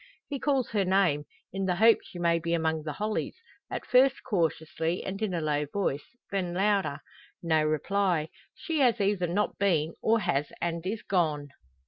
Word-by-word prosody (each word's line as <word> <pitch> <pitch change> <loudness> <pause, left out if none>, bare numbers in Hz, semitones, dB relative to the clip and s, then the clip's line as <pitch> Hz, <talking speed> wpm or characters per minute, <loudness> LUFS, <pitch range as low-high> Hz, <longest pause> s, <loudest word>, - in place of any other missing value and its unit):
He 280 -2 -4
calls 275 -3 0
her 205 -3 +2
name 185 -6 +2 0.3
in 195 0 -2
the 180 -1 +1
hope 225 +4 +6
she - - -12
may 170 -1 +2
be 170 +1 0
among 160 -1 0
the 150 - -3
hollies 215 +1 -2 0.3
at - - -5
first 265 +2 +4
cautiously 165 -2 -1
and 195 +2 -5
in 215 -3 0
a 170 -2 -1
low 150 -1 0
voice, 170 +2 -3
then 180 -3 -2
louder. 195 -6 +1 0.4
No 160 -2 +2
reply; 160 +1 0 0.3
she 325 -3 -3
has 245 -4 +3
either 195 -3 +1
not 200 +5 -1
been, 165 -5 +2
or 225 +1 +3
has 150 -6 0
and 170 -1 -2
is 210 +2 -3
gone. 155 -6 0
180 Hz, 175 wpm, -28 LUFS, 160-205 Hz, 0.4 s, hope